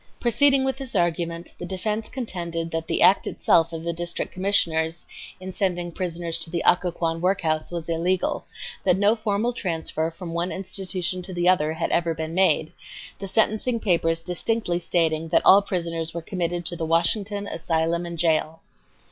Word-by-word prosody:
Proceeding 270 +3 +4
with 265 0 -1
this 265 -4 -6
argument, 170 -1 -1
the 175 - -5
defense 210 +4 -3
contended 170 -9 -4
that 165 0 -3
the - - +2
act 195 - +5
itself 165 0 +3
of 165 -1 -5
the 170 0 -1
District 170 +1 -4
Commissioners 170 -4 +1 0.3
in 185 0 -7
sending 175 -3 -1
prisoners 170 -1 -3
to 165 - -4
the 170 0 -2
Occoquan 170 -2 +2
workhouse 170 -4 +1
was 170 -2 -5
illegal; 170 +2 0 0.4
that 180 - +3
no 205 +3 +4
formal 215 +2 0
transfer 165 -5 -2
from 165 0 -8
one 170 +2 -1
institution 185 -1 -3
to 185 +1 -8
another 175 -3 +3
had 160 - -2
ever 170 -1 +2
been 160 0 -4
made, 160 -4 +3 0.5
the 195 - -5
sentencing 220 +4 +2
papers 165 -5 +1
distinctly 180 +1 -1
stating 165 -2 0
that - - +2
all 195 +2 +8
prisoners 170 -4 -3
were 170 - -4
committed 175 -1 -2
to 175 - -3
"the 165 - -4
Washington 200 +5 +1
Asylum 165 -1 -1
and 170 -1 -6
Jail." 160 -1 +1
175 Hz, 165 wpm, -24 LUFS, 165-190 Hz, 0.5 s, all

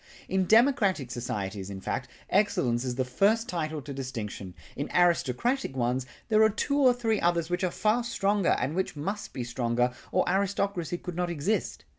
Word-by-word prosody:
In 190 0 0
democratic 220 - +3
societies, 105 -5 -4
in 100 -1 -6
fact, - - -3 0.2
excellence 130 - +2
is 125 -2 -2
the 130 0 0
first 215 - +2
title 155 -4 -3
to 140 +1 -6
distinction; 110 -8 -6 0.2
in - - -4
aristocratic 175 - +2
ones 125 +1 0 0.2
there 215 -1 +4
are 220 - +6
two 280 +7 0
or 260 -3 +6
three 225 -3 0
others 170 -1 +1
which 180 - -1
are 185 - +2
far 215 +6 +1
stronger 205 -4 +1
and 130 +5 -1
which 190 -1 -2
must 200 +8 -4
be 125 - -4
stronger 120 0 0 0.2
or 185 - +2
aristocracy 190 -2 0
could 180 -1 -7
not 180 0 -1
exist. 170 +6 -2
175 Hz, 175 wpm, -28 LUFS, 125-205 Hz, 0.2 s, are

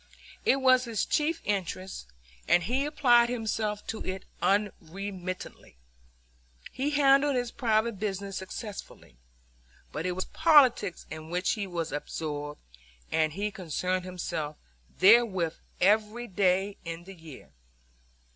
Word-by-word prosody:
It - - +5
was 255 -1 +4
his 225 -4 -1
chief 315 +2 0
interest, 185 - -3 0.4
and 175 +1 +4
he 255 +9 0
applied 245 -5 +4
himself 220 -3 -2
to 220 - -5
it 185 0 -5 0.2
unremittingly. 190 - -3 1.0
He 270 +3 -1
handled 280 -1 +4
his 245 -1 -1
private 220 -2 0
business 200 -1 -3
successfully; 190 - -8 0.7
but 160 +4 -3
it 180 - -1
was 185 +1 -3
politics 280 - +4
in 155 0 -7
which 180 +2 0
he 205 -3 -2
was 170 -3 -3
absorbed, 145 0 -5 0.5
and 155 -1 +1
he 205 +4 -2
concerned 185 0 -2
himself 160 -5 -4 0.4
therewith 190 -5 +5 0.3
every 215 +4 +2
day 195 -1 +1
in 165 0 -6
the 195 +2 -11
year. 160 - -13
195 Hz, 120 wpm, -28 LUFS, 175-235 Hz, 1.0 s, It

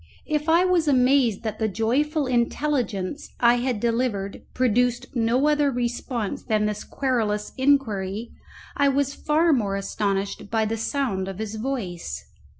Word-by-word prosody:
If 305 0 -1
I 340 +3 +5
was 355 -3 +2
amazed 255 -5 +3
that 220 -2 -4
the 220 - +1
joyful 270 - 0
intelligence 245 -2 -1
I 240 0 +5
had 245 -2 -1
delivered 230 -4 -1
produced 245 0 +2
no 245 +3 +2
other 295 -1 +3
response 240 -3 -2
than 215 -1 +1
this 210 0 -2
querulous 220 -6 -1
inquiry, 230 -6 0 0.4
I 285 -1 +3
was 280 0 +1
far 315 +3 +2
more 205 -7 0
astonished 200 0 -2
by 220 -1 +1
the 220 +1 -1
sound 225 -5 -1
of 195 -1 -6
his 215 0 -4
voice. 200 - -4
240 Hz, 145 wpm, -24 LUFS, 210-275 Hz, 0.4 s, I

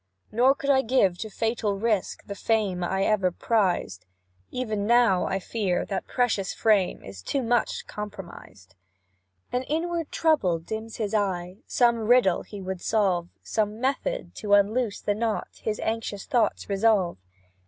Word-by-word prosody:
"Nor 255 +5 +4
could 280 -2 0
I 265 -1 +4
give 220 -8 +2
to 220 - -4
fatal 220 -1 -1
risk 215 -2 -1
The 200 - -5
fame 200 -3 0
I 190 +2 0
ever 200 -3 +2
prized; 180 - 0 0.4
Even 215 -5 -2
now, 235 -6 +4
I 190 - 0
fear, 195 -2 -1
that 195 -2 -4
precious 225 -6 0
fame 210 -5 +2
Is 95 -1 -9
too 270 - -1
much 240 0 0
compromised." 190 - -9 0.8
An 250 - 0
inward 330 +3 -2
trouble 295 - +2
dims 220 +7 -6
his 215 -2 -3
eye, 185 -3 -1
Some 235 -2 +3
riddle 240 -7 +4
he 205 - -9
would 185 -1 -4
solve; 185 -6 +1
Some 215 0 -1
method 275 - -2
to 205 -1 +3
unloose 210 +2 +1
a 205 - +3
knot, 220 +1 -3
His 215 -1 -2
anxious 220 -3 -3
thoughts 240 -7 +1
revolve. 200 - +2
215 Hz, 150 wpm, -26 LUFS, 190-235 Hz, 0.8 s, Nor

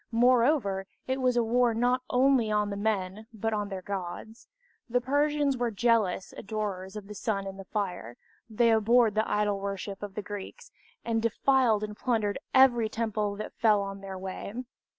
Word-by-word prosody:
Moreover, 235 -4 +3 0.2
it 260 +1 -2
was 250 -1 +2
a 240 - +4
war 235 0 +2
not 245 +2 +2
only 255 -3 +3
on 210 -1 +1
the - - -3
men 205 0 -2
but 225 0 -2
on 205 -1 -2
their 190 -2 -6
gods. 200 +4 -6 0.4
The 245 +1 +2
Persians 285 +1 +1
were 240 -1 0
zealous 225 -6 +1
adorers 200 -2 -4
of 210 -2 -7
the 210 - -8
sun 200 -2 -2
and 195 0 -7
the 195 - -8
fire, 180 - -4 0.3
they 230 +1 +3
abhorred 225 +1 +4
the 215 +1 0
idol 205 -1 +1
worship 195 0 -5
of 205 -1 -7
the 210 - -4
Greeks, 205 0 -8 0.3
and 225 -1 0
defiled 230 -1 +2
and 210 0 -5
plundered 215 -3 -1
every 245 -4 +5
temple 215 -2 -2
that 215 - -6
fell 210 -3 +2
in 195 0 -10
their 195 -1 -7
way. 195 +5 -6
215 Hz, 175 wpm, -28 LUFS, 200-240 Hz, 0.4 s, every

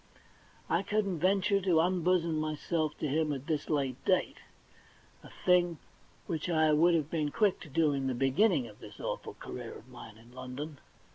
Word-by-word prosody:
I 170 - +1
couldn't 200 -4 -1
venture 195 +2 +2
to 180 -4 +3
unbosom 175 -2 +2
myself 155 0 -2
to 155 - -2
him 150 +2 +1
at 135 -1 -4
this 155 -2 -2
late 135 -4 -1
date, - - +1 0.8
a - - -13 0.2
thing 175 -2 +4 0.5
which 165 -1 -3
I 155 -2 +3
would 170 +3 +5
have 155 -2 -1
been 155 -3 0
quick 205 +4 +1
to 155 - -11
do 150 +1 +2
in 135 -1 -1
the 130 - -1
beginning 135 - +2
of 105 -2 -14
this - - -12
awful - - -4
career - - -8
of - - -13
mine - - -11
in 115 +2 -18
London. 130 +3 -7
155 Hz, 180 wpm, -31 LUFS, 140-175 Hz, 0.8 s, would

